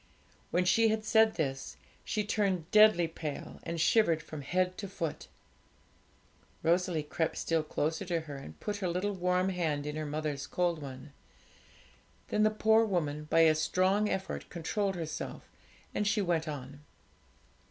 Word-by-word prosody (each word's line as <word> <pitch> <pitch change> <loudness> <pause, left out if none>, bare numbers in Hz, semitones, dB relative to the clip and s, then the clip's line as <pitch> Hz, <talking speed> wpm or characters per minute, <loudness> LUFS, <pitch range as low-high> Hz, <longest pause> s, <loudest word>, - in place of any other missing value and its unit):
When 180 +1 +1
she 225 +5 +4
had 215 0 0
said 220 0 +4
this, 135 -4 -3 0.3
she 215 - -1
turned 195 -5 -1
deadly 215 -5 +6
pale, 160 -2 -6
and 170 0 -4
shivered 165 -4 +3
from 155 -2 -7
head 180 +6 0
to 200 - -4
foot. 165 -4 -4 1.4
Rosalie 170 -1 +2
crept 160 +2 -2
still 165 -1 +1
closer 155 +3 -2
to 170 -2 -1
her, 150 -3 -8
and 80 - -10
put 205 0 -3
her 195 -2 -2
little 185 +4 -1
warm 180 0 +1
hand 160 -6 -1
in 150 0 -4
her 155 -1 -3
mother's 150 -2 -3
cold 175 -3 0
one. 135 +1 -9 1.2
Then 210 - +1
the 215 - +5
poor 220 +1 +4
woman 150 -8 -1
by 165 +2 +3
a 160 -1 +6
strong 185 +6 +2
effort 190 0 -3
controlled 195 +4 -2
herself, 160 -3 -5 0.5
and 210 - 0
she 215 +1 +2
went 170 -3 0
on. 145 0 -7
170 Hz, 155 wpm, -31 LUFS, 155-200 Hz, 1.4 s, deadly